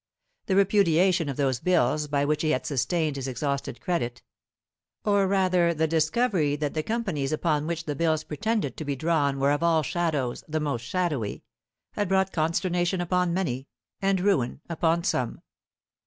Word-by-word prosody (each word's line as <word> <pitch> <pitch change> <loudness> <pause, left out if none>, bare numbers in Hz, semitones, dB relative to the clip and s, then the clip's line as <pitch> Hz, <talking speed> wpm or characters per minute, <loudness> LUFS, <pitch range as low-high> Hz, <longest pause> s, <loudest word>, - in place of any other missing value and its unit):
The 190 - +1
repudiation 185 -4 +3
of 135 - -4
those 135 -4 +1
bills 150 -3 +2
by 145 -1 +1
which 150 +1 0
he 155 - +1
had 130 -4 0
sustained 150 +2 0
his 135 -1 -4
exhausted 135 0 -3
credit, 120 -9 -2 0.8
or 200 -2 +3
rather 185 -3 +2
the 160 +1 +2
discovery 160 0 +1
that 145 -1 -2
the 155 - 0
companies 185 -9 -2
upon 155 -1 0
which 170 0 -2
the 150 - -2
bills 155 +1 +1
pretended 205 - -2
to - - -4
be 140 -1 -1
drawn 145 -2 +1
were 140 +1 +3
of 145 - 0
all 165 -2 +3
shadows 150 -5 -1
the 155 0 -1
most 145 -6 -2
shadowy, 150 - -2 0.5
had 205 -3 -2
brought 190 0 +2
consternation 175 +3 0
upon 180 0 +1
many, 140 -8 -2 0.3
and 195 -1 +2
ruin 150 -12 +1
upon 170 0 +1
some. 125 -7 -1
160 Hz, 165 wpm, -26 LUFS, 145-180 Hz, 0.8 s, repudiation